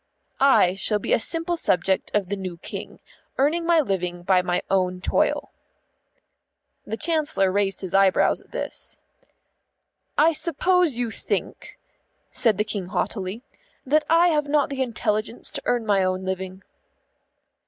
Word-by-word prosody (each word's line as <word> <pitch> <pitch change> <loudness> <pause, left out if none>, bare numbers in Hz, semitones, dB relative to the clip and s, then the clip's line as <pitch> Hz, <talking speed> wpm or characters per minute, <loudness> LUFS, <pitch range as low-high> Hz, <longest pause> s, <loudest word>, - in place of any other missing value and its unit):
"I 265 -10 +5
shall 210 +2 +1
be 205 - -1
a - - +4
simple 330 +7 0
subject 190 - +1
of 200 -3 0
the 200 - -1
new 185 -3 -6
King, - - -8 0.4
earning 325 +5 +1
my 340 -1 +5
living 180 - -2
by 185 0 +3
my 180 0 -1
own 185 -1 0
toil." - - 0 1.4
The 220 - -3
Chancellor 300 - +1
raised 195 0 0
his 185 -3 -6
eyebrows 195 -1 +3
at - - -25
this. - - -6 1.2
"I 325 +2 +5
suppose 340 -2 +1
you 240 -2 -1
think," - - -4 0.5
said 220 -5 +2
the 210 - +2
King 200 -4 -4
haughtily, 195 +3 -3 0.4
"that 300 +3 +3
I 335 +2 +5
have 300 -3 +1
not 290 -1 +2
the 270 -1 -3
intelligence 220 -2 -2
to - - -3
earn 240 -2 0
my 200 -3 +2
own 185 0 -1
living." 190 0 -5
210 Hz, 145 wpm, -24 LUFS, 190-290 Hz, 1.4 s, I